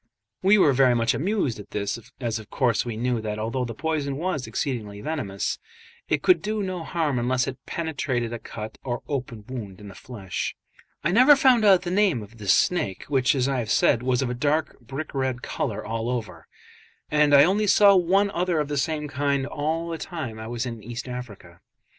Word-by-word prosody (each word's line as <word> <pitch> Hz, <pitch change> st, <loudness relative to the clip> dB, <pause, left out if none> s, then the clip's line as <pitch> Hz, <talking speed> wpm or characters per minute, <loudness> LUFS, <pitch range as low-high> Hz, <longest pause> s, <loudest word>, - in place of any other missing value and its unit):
We 195 Hz, +3 st, +5 dB
were 150 Hz, -8 st, +5 dB
very 130 Hz, -1 st, +4 dB
much 115 Hz, 0 st, +2 dB
amused 170 Hz, -, -1 dB
at 105 Hz, -, -11 dB
this, 100 Hz, +2 st, -3 dB, 0.2 s
as 115 Hz, -3 st, -2 dB
of 110 Hz, -, -12 dB
course 120 Hz, -5 st, +1 dB
we 115 Hz, -3 st, -5 dB
knew 120 Hz, 0 st, 0 dB
that 105 Hz, -1 st, -3 dB
although 115 Hz, +4 st, -2 dB
the 115 Hz, -2 st, -6 dB
poison 150 Hz, -2 st, -2 dB
was 155 Hz, -5 st, -2 dB
exceedingly 110 Hz, -7 st, -3 dB
venomous, 105 Hz, -8 st, -3 dB, 0.5 s
it -, -, +1 dB
could 365 Hz, -, +5 dB
do 215 Hz, 0 st, -2 dB
no 185 Hz, -3 st, -4 dB
harm 155 Hz, -7 st, -1 dB
unless 125 Hz, +1 st, +1 dB
it 135 Hz, -1 st, -7 dB
penetrated 130 Hz, -8 st, -2 dB
a 120 Hz, -, -4 dB
cut 110 Hz, -1 st, -8 dB
or 120 Hz, -2 st, -3 dB
open 125 Hz, -7 st, -4 dB
wound 105 Hz, -8 st, -7 dB
in 105 Hz, -1 st, -10 dB
the -, -, -11 dB
flesh. 100 Hz, -7 st, -5 dB, 0.5 s
I 170 Hz, -, +1 dB
never 255 Hz, +8 st, +7 dB
found 255 Hz, -4 st, +4 dB
out 190 Hz, -3 st, +6 dB
the 175 Hz, -, -3 dB
name 185 Hz, -, +2 dB
of 110 Hz, +3 st, -15 dB
this 100 Hz, -3 st, +2 dB
snake, 100 Hz, -, +1 dB
which, 135 Hz, -1 st, +2 dB
as 130 Hz, -1 st, +1 dB
I 135 Hz, -2 st, 0 dB
have 115 Hz, -3 st, -4 dB
said, 115 Hz, -, +3 dB
was 125 Hz, +1 st, +1 dB
of 125 Hz, -, -2 dB
a -, -, -1 dB
dark 150 Hz, +5 st, 0 dB
brick 135 Hz, +5 st, -7 dB
red 130 Hz, -2 st, -2 dB
colour 110 Hz, -1 st, -3 dB
all 115 Hz, +1 st, -2 dB
over; 110 Hz, -8 st, -4 dB, 0.6 s
and 150 Hz, -1 st, +4 dB
I 140 Hz, 0 st, +8 dB
only 200 Hz, +6 st, +2 dB
saw 200 Hz, 0 st, +7 dB
one 195 Hz, +3 st, +3 dB
other 175 Hz, -2 st, 0 dB
of 150 Hz, -1 st, -1 dB
the 145 Hz, -, -2 dB
same 150 Hz, +1 st, -1 dB
kind 140 Hz, -1 st, 0 dB
all 160 Hz, +4 st, -2 dB
the 165 Hz, -1 st, -4 dB
time 130 Hz, -11 st, -5 dB
I 110 Hz, -, -6 dB
was 120 Hz, +1 st, -3 dB
in 115 Hz, -3 st, -6 dB
East 120 Hz, +4 st, -6 dB
Africa. 105 Hz, -9 st, -8 dB
130 Hz, 205 wpm, -25 LUFS, 115-160 Hz, 0.6 s, I